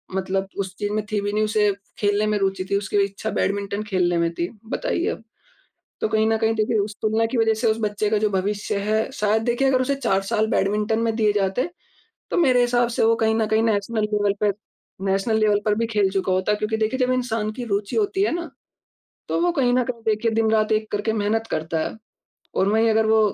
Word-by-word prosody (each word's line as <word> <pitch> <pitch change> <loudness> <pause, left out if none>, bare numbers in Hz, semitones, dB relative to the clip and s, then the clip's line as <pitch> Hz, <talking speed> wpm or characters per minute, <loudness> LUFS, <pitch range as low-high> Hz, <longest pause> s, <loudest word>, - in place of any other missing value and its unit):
मतलब 190 0 -1
उस 190 -1 -3
चीज़ 205 0 -2
में 215 0 -1
थी 210 -1 0
भी 205 0 -2
नहीं 215 +1 +1
उसे 210 -1 +2 0.3
खेलने 205 +1 +1
में 210 0 +1
रुचि 195 -1 -1
थी, 200 - +3
उसकी 200 0 -2
इच्छा 200 +2 -4
बैडमिंटन 200 +1 -1
खेलने 180 -4 0
में 170 0 +1
थी, 170 +1 -2 0.2
बताइए - - -2
अब। - - -5 0.8
तो - - +1
कहीं 220 0 +2
न 225 - +2
कहीं 225 0 +1
देखिए 220 0 +1
उस 205 +1 -2
तुलना 220 +1 +2
की 240 +2 -3
वज़ह 225 -1 +3
से 235 - +1
उस 220 - 0
बच्चे 210 -1 -1
का 215 - +2
जो 215 0 +1
भविष्य 200 +1 -1
है 220 0 +1
शायद 215 +1 +1
देखिए, 245 +3 +1
अगर 260 -1 +3
उसे 280 +2 0
4 195 -8 0
साल 215 +2 0
बैडमिंटन 210 +2 +1
में 225 -1 0
दिए 215 -2 +3
जाते, 205 - 0 0.6
तो - - -1
मेरे 260 -7 +4
हिसाब 240 0 +2
से - - +2
वो 225 +1 +4
कहीं 220 0 +2
न 220 -1 +1
कहीं 220 +1 +2
नेशनल 220 0 0
लेवल 205 -1 +2
पे 210 - +3 0.6
नेशनल 195 +3 +1
लेवल 210 -1 +3
पर 210 -2 +2
भी 230 +2 -1
खेल 210 -4 +1
चुका 190 -1 -1
होता, 190 +3 +1
क्योंकि 215 +1 -2
देखिए 220 +4 -1
जब 255 0 +2
इंसान 230 -4 -1
की 245 +3 -6
रुचि 200 0 -1
होती 400 -3 +1
है 405 - +1
ना, 340 -3 -4 0.8
तो - - 0
वो 350 0 +2
कहीं 265 -7 +2
न 250 - +3
कहीं 235 -2 -5
देखिए 220 +1 +1
दिन-रात 220 -1 +2
एक 215 0 0
करके 210 +2 0
मेहनत 220 +2 0
करता 160 +1 -2
है। - - -10 0.6
और 190 - +2
वही 220 +2 +3
अगर 220 0 +3
वो 220 0 +4
215 Hz, 230 wpm, -23 LUFS, 205-225 Hz, 0.8 s, मेरे